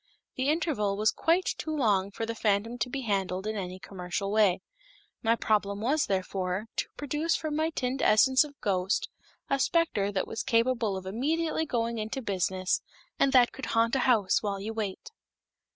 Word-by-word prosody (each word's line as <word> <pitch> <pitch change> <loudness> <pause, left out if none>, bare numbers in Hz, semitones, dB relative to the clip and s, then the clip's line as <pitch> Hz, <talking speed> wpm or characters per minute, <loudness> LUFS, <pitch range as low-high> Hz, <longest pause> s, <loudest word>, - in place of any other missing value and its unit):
The 260 +2 0
interval 270 - 0
was 215 +1 +3
quite 345 +3 +1
too - - -4
long 200 -7 +2
for 225 +3 -4
the 230 - -3
phantom 225 +2 0
to 225 - -1
be 270 +2 -3
handled 195 -4 -1
in 215 0 -2
any 185 -2 -4
commercial 190 +1 -4
way. 205 -4 +3 0.6
My 230 -1 +3
problem 205 -3 0
was, 280 +8 +1
therefore, 190 0 -2
to - - 0
produce 295 +4 0
from 310 -2 -3
my 315 +1 +1
tinned 260 -4 -2
Essence 260 +6 +5
of 285 -2 -12
Ghost 190 0 0 0.4
a 275 - 0
specter 265 - +1
that 195 - -1
was 225 - -3
capable 230 -4 +1
of 190 - -8
immediately 310 - -1
going 235 -2 -1
into 220 +5 -3
business 190 -4 0 0.4
and 275 - +4
that 245 -2 +6
could 265 - -7
haunt 230 +2 +3
a - - +2
house 230 -7 +3
while 200 -2 -2
you 215 +3 -4
wait. 215 - -4
225 Hz, 180 wpm, -28 LUFS, 200-265 Hz, 0.6 s, that